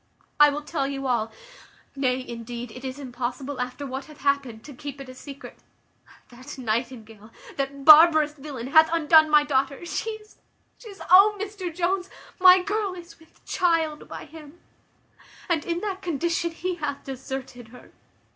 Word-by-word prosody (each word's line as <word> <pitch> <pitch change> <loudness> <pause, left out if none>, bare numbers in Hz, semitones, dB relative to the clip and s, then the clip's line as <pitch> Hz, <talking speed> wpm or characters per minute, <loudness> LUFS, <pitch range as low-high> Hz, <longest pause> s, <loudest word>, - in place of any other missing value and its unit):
I 295 0 +8
will 290 +1 -4
tell 290 -3 -2
you 275 -1 -5
all: 235 -4 0 0.6
nay, 260 -1 -1
indeed, 235 0 -7
it 255 +3 -11
is 260 0 -5
impossible, 255 0 -5
after 250 +3 -5
what 265 0 -6
hath 305 -1 -15
happened, 280 -6 -1
to 290 - -11
keep 280 +1 -8
it 275 - -9
a - - -9
secret. 275 +2 -11 0.7
That 255 +4 -11
Nightingale, 225 -2 -4 0.3
that 275 0 -4
barbarous 310 -1 +8
villain, 275 -5 -8
hath 315 +2 +6
undone 315 -1 +5
my 300 -1 +5
daughter. 275 +2 -1
She 440 - -3
is 435 -1 -10 0.4
she 450 - -12
is 400 - -11
oh! 405 +3 +7
Mr 400 -3 -5
Jones, 360 +3 -1 0.3
my 365 0 +7
girl 410 -1 -2
is 345 -1 -13
with 320 - -24
child 330 -4 0
by - - -8
him; 310 +1 -14 0.9
and 330 -5 0
in 340 0 -2
that 390 -2 -4
condition 340 +1 -1
he 350 +2 -4
hath 295 -3 -4
deserted 265 -2 -7
her. 245 +2 -16
290 Hz, 165 wpm, -25 LUFS, 260-340 Hz, 0.9 s, I